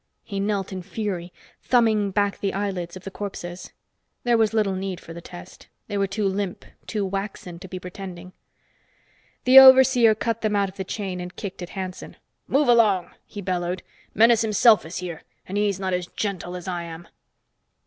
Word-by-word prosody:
He 200 -2 -5
knelt 200 -1 -1
in 185 -1 -5
fury, 185 -2 -4 0.3
thumbing 220 -5 +3
back 200 +1 0
the 195 -1 -2
eyelids 190 -4 -3
of 185 - -13
the 195 - -7
corpses. 180 -3 -7 0.5
There 240 -1 +3
was 220 -2 +3
little 215 -3 +1
need 190 -1 -4
for 165 - -11
the 170 - -9
test. 175 +1 -12 0.2
They 205 - -4
were 200 -1 +1
too 200 +2 -2
limp, 195 -1 -3 0.2
too 210 -3 -1
waxen 195 -3 -5
to 190 - -9
be 185 - -6
pretending. 180 -1 -9 1.1
The 260 +1 +10
overseer 260 -4 +8
cut 230 +1 -2
them 215 -1 0
out 200 -1 +1
of 190 - -16
the 190 - -3
chain 190 -1 -4
and 180 +1 -8
kicked 195 -3 -7
at 175 - -6
Hanson. 185 -1 -6 0.3
"Move 285 +2 +2
along!" 215 -7 +4 0.2
he 205 - -8
bellowed. 180 -1 -2 0.3
"Menes 230 +1 +5
himself 215 -3 +4
is 170 - -6
here, 175 -3 -6 0.3
and 190 - -5
he's 205 -2 +1
not 190 -1 -2
as 180 -1 -2
gentle 185 -4 -4
as 180 +1 -8
I 175 -2 -2
am." 170 0 -9
195 Hz, 185 wpm, -24 LUFS, 180-210 Hz, 1.1 s, The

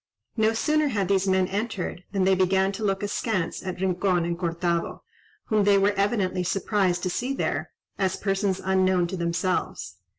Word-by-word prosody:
No 220 0 +2
sooner 305 +6 +1
had 205 -8 0
these 195 -1 +2
men 190 -1 +3
entered, 200 -3 -3
than 195 -2 +1
they 190 +1 +4
began 190 +1 +2
to 215 +3 -6
look 195 -1 0
askance 205 -3 -2
at 185 -1 -5
Rincon 185 -1 +1
and 170 0 -1
Cortado, 170 0 -2 0.5
whom 215 -2 +3
they 200 0 +5
were 200 +1 +3
evidently 195 -2 0
surprised 185 -1 0
to 185 - 0
see 255 +8 -2
there, - - -2 0.3
as 190 -1 +1
persons 195 -1 -1
unknown 185 -1 +3
to 180 +2 -4
themselves. 170 - -2
190 Hz, 170 wpm, -25 LUFS, 180-205 Hz, 0.5 s, they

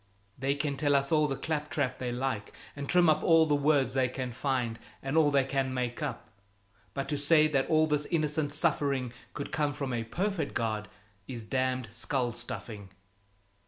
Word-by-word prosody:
They 135 +2 0
can 140 -1 -2
tell 145 -1 +2
us 140 0 +1
all 155 -1 +4
the 135 - -2
clap 150 0 -2
trap 130 -4 -1
they 125 -1 -2
like, 125 -4 -2 0.2
and 140 -1 -6
trim 180 -1 +5
up 155 -1 +4
all 165 -1 +6
the 150 - +1
words 145 -2 +3
they 130 -1 +2
can 125 0 -4
find 125 -3 -1 0.2
and 135 +2 -2
all 160 -2 +5
they 140 -2 +3
can 135 -1 -1
make 125 -1 -2
up, - - -4 0.7
but 135 - -2
to 150 - 0
say 155 +1 +5
that 135 -3 +1
all 155 -1 +5
this 150 -1 0
innocent 155 -2 0
suffering 140 -5 +1 0.2
could 145 - -5
come 150 -2 0
from 140 -3 -3
a 115 -1 -1
perfect 175 - -2
God, 110 -3 -1 0.4
it's 120 -3 -6
damned 130 +1 -1
skull 120 +2 -1
stuffing." 105 -4 -7
140 Hz, 190 wpm, -30 LUFS, 125-150 Hz, 0.7 s, all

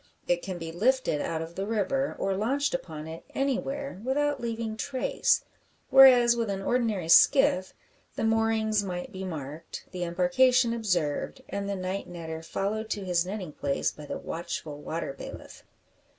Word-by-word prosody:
It 175 0 +2
can 185 -2 -5
be 165 -1 -6
lifted 215 - +1
out 160 -1 -2
of 165 +1 -9
the 195 +3 -4
river, 245 +6 0
or 195 0 0
launched 270 +8 0
upon 160 -13 -5
it 160 +1 -8
anywhere, 275 -3 -2
without 285 +1 0
leaving 230 -2 -3
trace; 285 - +1 0.5
whereas 250 -3 +8
with 230 -2 -1
an 195 -1 -3
ordinary 220 -8 0
skiff 185 - +5 0.4
the - - -2
moorings 225 -1 +2
might 180 +5 -5
be 190 -2 -6
marked, 155 -2 -7
the 180 -1 -3
embarkation 230 +8 +3
observed, 185 - -1
and 200 0 -3
the 200 - -1
night 185 +1 -4
netter 160 -2 -6
followed 215 +5 -2
to 205 -3 -3
his 180 -1 +1
netting 190 -4 -5
place 140 -1 -1
by 150 -1 -11
the - - -4
watchful 160 -3 -5
water 160 -2 -4
bailiff. - - -10
200 Hz, 160 wpm, -28 LUFS, 170-240 Hz, 0.5 s, whereas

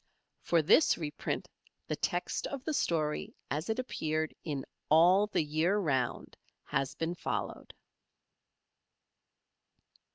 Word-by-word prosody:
For 170 -2 +2
this 300 - +5
reprint 150 -3 -3 0.4
the - - -2
text - - -1
of 275 -2 -6
the 315 - -2
story 155 - 0 0.2
as 155 +6 -2
it 220 - 0
appeared 155 -11 -2
in 145 -4 -3 0.2
"All 180 +6 +6
the 205 - +1
Year 160 +6 +1
Round" 135 -10 -1 0.3
has 135 0 -1
been 165 +1 -2
followed. 175 - -4
160 Hz, 110 wpm, -32 LUFS, 150-190 Hz, 0.4 s, All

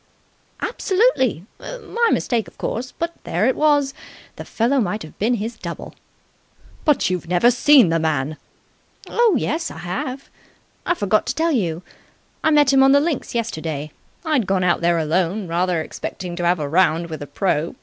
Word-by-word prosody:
"Absolutely! 375 - +1
My 475 -2 -2
mistake, 235 -3 0
of - - -17
course, 250 +3 -4
but 335 0 -4
there 180 +6 0
it 260 - +2
was. 290 -2 +2 0.4
The - - -8
fellow 245 +5 +1
might 210 -1 -1
have 155 - -12
been 230 +4 +2
his 225 +1 -5
double." 170 -4 -7 0.9
"But 295 - +2
you've 180 -2 -3
never 180 +8 +4
seen 255 - +5
the 165 0 +1
man." 155 -1 -1 0.7
"Oh 470 -6 +3
yes, 325 +6 -2
I - - -10
have. 190 +11 -5 0.6
I 350 - +2
forgot 210 - +1
to - - -1
tell 330 +1 +1
you. 180 - -1 0.6
I 315 - +4
met 295 -3 +4
him 270 - +5
on 270 0 +6
the 285 - +6
links 300 -5 -2
yesterday. 160 -10 -3 0.3
I'd 290 -10 +1
gone 190 -1 +1
out 175 -1 +2
there 170 0 +2
alone, 175 +5 0
rather 175 0 0
expecting 180 +1 -6
to 175 - -2
have 175 0 +2
a 150 - -2
round 170 +1 +2
with 155 - -5
the 145 - -7
pro. 170 - -1
210 Hz, 175 wpm, -21 LUFS, 170-280 Hz, 0.9 s, on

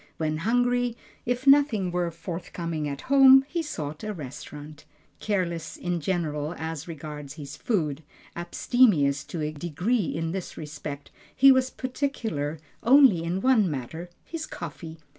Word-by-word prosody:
When 155 -1 -1
hungry, 245 +5 +1 0.3
if 245 +2 -1
nothing 275 -10 +4
were 175 -1 0
forthcoming 165 -1 -5
at 140 0 -5
home, 270 0 +7
he 340 +3 -2
sought 155 - -5
a 215 -1 -4
restaurant. 150 +1 -9 0.4
Careless 170 -5 -2
in 175 -1 -2
general 155 -2 -2
as 160 0 -5
regards 150 -3 -7
his 145 -3 -8
food, 160 - -1 0.3
abstemious 175 - +2
to 165 -3 -4
a 150 - -1
degree 175 - -1
in 165 0 -2
this 190 0 -5
respect, 145 -2 -7 0.2
he 275 +1 +8
was 260 0 +3
particular 235 - -3 0.2
only 250 - +6
on 180 +3 -1
one 230 -7 +4
matter, 155 +5 -5 0.2
his 325 -2 -5
coffee. 160 0 -8
170 Hz, 140 wpm, -26 LUFS, 155-245 Hz, 0.4 s, he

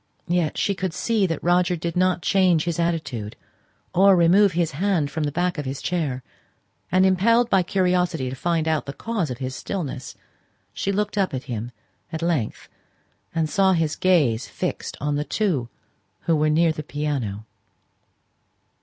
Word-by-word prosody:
Yet 175 -3 0
she 200 - +1
could 185 -2 -3
see 220 -4 +1
that 165 -3 -3
Roger 180 +1 +3
did 170 0 -4
not 180 -1 +2
change 180 -5 +3
his 170 -1 -2
attitude 155 -11 -2 0.6
or 195 +2 +6
remove 180 +3 +5
his 170 -1 0
hand 165 -2 0
from 155 +1 -2
the 145 - -1
back 175 +1 -1
of 145 - -4
his 135 +1 -4
chair, 150 -8 -2 0.7
and, 185 +1 +4
impelled 230 +6 +3
by 195 - +5
curiosity 180 -5 +1
to 130 - -4
find 165 +2 0
out 155 -2 0
the 140 - -4
cause 215 -7 -2
of 125 - -4
his 130 0 -4
stillness, 145 -9 -5 0.6
she 195 - -1
looked 210 +1 -1
up 190 -8 +1
at 130 - -4
him 120 -3 -5 0.4
at 160 0 -4
length, 160 -10 -1 0.7
and 160 -1 +1
saw 190 +4 +3
his 160 -3 0
gaze 145 -11 +2
fixed - - -4
on 145 0 -1
the 145 - 0
two 150 - -1 0.5
who 165 - +1
were 155 0 +2
near 165 +2 +3
the 155 - -5
piano. 140 -9 -3
165 Hz, 170 wpm, -23 LUFS, 145-185 Hz, 0.7 s, or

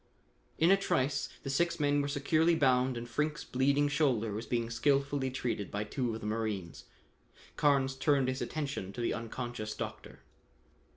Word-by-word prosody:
In 165 +3 +5
a 195 - +7
trice 135 -7 0
the 135 - -4
six 170 +5 +1
men 145 -1 +2
were 140 - -1
securely 155 +4 +2
bound 130 -4 +3
and 120 0 -5
Frink's 150 +6 -1
bleeding 140 +3 +2
shoulder 130 -7 +1
was 110 +3 -5
being 115 -1 -1
skilfully 140 +2 +1
treated 120 -5 -3
by 105 +1 -2
two 120 +1 -2
of 110 - -7
the - - -7
marines. 105 -8 -3 0.7
Carnes 135 -2 +3
turned 135 -1 +2
his 130 +1 -2
attention 135 -11 -3
to 120 - -5
the 120 - 0
unconscious 115 -2 -5
doctor. - - -7
130 Hz, 165 wpm, -32 LUFS, 115-145 Hz, 0.7 s, a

